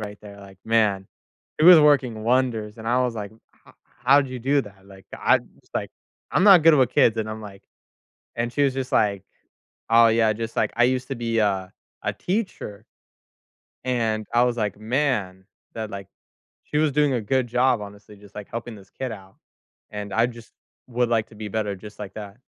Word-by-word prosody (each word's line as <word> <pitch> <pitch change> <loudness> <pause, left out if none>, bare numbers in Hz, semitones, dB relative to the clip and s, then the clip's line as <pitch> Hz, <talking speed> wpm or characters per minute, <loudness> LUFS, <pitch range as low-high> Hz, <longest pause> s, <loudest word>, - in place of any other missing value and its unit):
right 105 -1 -7
there, 100 -1 -12
like, 95 -1 -14
man. 105 -4 +1 0.5
It - - +4
was 175 -1 +10
working 130 -7 +2
wonders, 115 -3 0
and 110 0 -5
I 125 +2 +2
was 125 -2 -2
like, 105 -2 -5 0.4
"H - - -19 0.3
how'd 140 +1 +5
you 130 0 -6
do 140 +4 +2
that? 95 -2 -15
Like, 95 -1 -16
I - - +4 0.2
it's - - -29
like, - - -3 0.4
I'm - - +2
not 190 -6 +8
good 165 -1 +8
with 130 -4 +3
kids," 115 -2 +3
and 110 -1 -2
I'm 110 0 -6
like 100 -2 -11 0.7
and 120 0 -2
she 145 - 0
was 135 -2 +1
just 130 -1 -4
like, 100 -3 +2 0.7
"Oh, 115 0 +6
yeah, 110 -1 +3
just 115 +1 -6
like, - - +1
I 120 - +5
used 125 0 -1
to 135 - -3
be 115 -1 -2
a 95 -3 0 0.3
a - - 0
teacher." 180 - -4 1.0
And 115 -4 -1
I 120 +1 +4
was 120 -1 0
like, 105 -3 -2
"Man," 110 -6 -1 0.3
that, 110 -1 -4
like, 100 -1 -7 0.6
she 150 - -4
was 155 -1 +2
doing 145 -1 +2
a 120 - -1
good 130 +4 0
job, 125 0 +2
honestly, 105 +1 -11
just, 100 0 -17
like, 105 -1 -8
helping 115 0 -6
this 100 -2 -16
kid 130 -2 -5
out, 95 -3 -11 0.6
and 105 -1 -6
I 115 +3 +3
just 115 -1 -12 0.4
would 120 -1 0
like 115 -2 +1
to 110 - -16
be 105 0 -6
better 105 -1 -2
just 105 +3 -13
like 100 -2 -7
that. 105 0 -9
115 Hz, 205 wpm, -23 LUFS, 105-125 Hz, 1.0 s, was